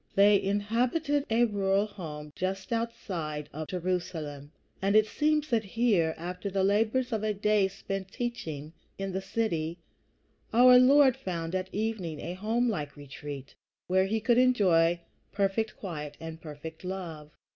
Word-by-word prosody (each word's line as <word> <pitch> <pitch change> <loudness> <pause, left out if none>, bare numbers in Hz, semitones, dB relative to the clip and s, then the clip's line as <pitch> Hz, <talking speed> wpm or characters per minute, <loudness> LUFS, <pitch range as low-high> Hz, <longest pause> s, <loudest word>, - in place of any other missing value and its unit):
They 200 0 +6
inhabited 245 +9 0
a 230 +2 +4
rural 200 -2 +1
home 150 -8 -8
just 190 +4 -3
outside 170 -10 -3
of 155 +1 -5
Jerusalem; 170 -6 -3 0.3
and 195 +2 +2
it 215 0 +7
seems 300 +5 +1
that 225 -2 +2
here, 200 -6 +1
after 180 +4 -5
the 195 0 0
labors 225 +5 +2
of 220 - 0
a 215 -1 0
day 210 -1 +3
spent 195 0 -5
in - - -27
teaching 165 - -4 0.2
in 195 0 -3
the 190 +1 -2
city, 175 -6 -1 0.8
our 250 +2 +8
Lord 265 0 +6
found 175 -9 -4
at 185 0 -2
evening 205 -7 -2
a 175 - -4
homelike 210 -6 -1
retreat 145 -1 -8 0.3
where 190 +1 +2
he 220 +3 0
could 235 +2 +3
enjoy 180 -9 +4 0.3
perfect 200 +2 0
quiet 150 -6 -6
and 160 0 -8
perfect 160 +2 -9
love. 170 -5 -6
195 Hz, 145 wpm, -29 LUFS, 165-225 Hz, 0.8 s, our